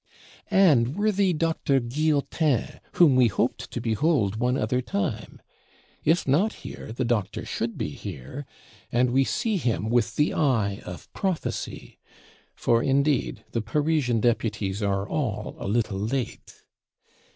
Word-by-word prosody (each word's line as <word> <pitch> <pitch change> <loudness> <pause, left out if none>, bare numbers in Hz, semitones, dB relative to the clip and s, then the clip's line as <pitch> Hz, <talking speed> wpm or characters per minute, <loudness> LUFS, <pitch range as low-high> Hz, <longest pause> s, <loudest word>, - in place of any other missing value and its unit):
And 155 - +4
worthy 205 -2 +2
Doctor 160 -4 +1
Guillotin, 145 +2 0
whom 155 -7 +5
we 125 -2 +6
hoped 105 - -1
to - - -4
behold 115 - +1
one 125 +3 +1
other 125 +3 0
time? 145 - -3 0.6
If 165 +1 +2
not 170 +11 +3
here, - - -7
the 125 +3 -2
Doctor 110 -4 -1
should 115 0 -3
be - - -2
here, 100 - -8 0.4
and 120 +1 +2
we 135 +2 +4
see 225 - 0
him 115 - -1
with 120 -2 +1
the 150 - +2
eye 110 -9 +1
of 90 +5 -9
prophecy; 190 -4 -3 0.6
for 115 0 +2
indeed 140 +1 +1
the 115 - -1
Parisian 135 -1 +1
Deputies 110 -4 0
are 100 0 0
all 115 -7 -2
a - - -4
little 105 -2 0
late. 120 +5 -4
125 Hz, 135 wpm, -26 LUFS, 110-155 Hz, 0.6 s, we